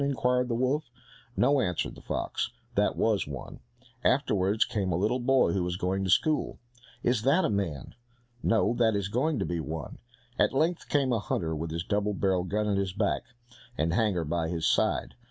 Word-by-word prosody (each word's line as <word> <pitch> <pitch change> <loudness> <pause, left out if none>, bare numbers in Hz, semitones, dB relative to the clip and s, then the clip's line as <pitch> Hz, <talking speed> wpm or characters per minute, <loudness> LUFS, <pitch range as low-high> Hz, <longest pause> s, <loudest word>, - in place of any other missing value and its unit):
inquired 125 -2 +1
the 120 - -1
wolf. 130 +4 0 0.5
"No," 140 0 +4
answered 90 -6 -1
the - - -13
fox, - - -2 0.2
"that - - +2
was 110 -7 +1
one." 70 -3 -7 0.4
Afterwards 100 +2 +2
came 105 -6 -2
a 80 - +1
little 110 +7 +1
boy 130 -5 +3
who 95 - 0
was 90 0 -2
going 95 +1 -1
to 95 - -2
school. 155 - +2 0.5
"Is 120 -2 +2
that 140 +10 +3
a - - 0
man?" 95 -9 -3 0.5
"No, 110 0 +2
that 115 -3 +2
is 100 -1 -1
going 135 +7 0
to - - -1
be 85 -1 -2
one." 80 -2 -6 0.4
At - - +3
length 160 +5 0
came 135 -4 +2
a 115 - +1
hunter 80 -4 -2
with 80 +2 -4
his 85 +1 -3
double 105 +2 0
barrelled 95 -2 0
gun 105 +3 0
at 100 -1 +1
his 95 -2 -2
back, 100 +1 0 0.6
and 80 +2 +1
hanger 100 -4 +1
by 80 +1 -1
his 80 -1 -2
side. - - +1
100 Hz, 190 wpm, -28 LUFS, 90-125 Hz, 0.6 s, No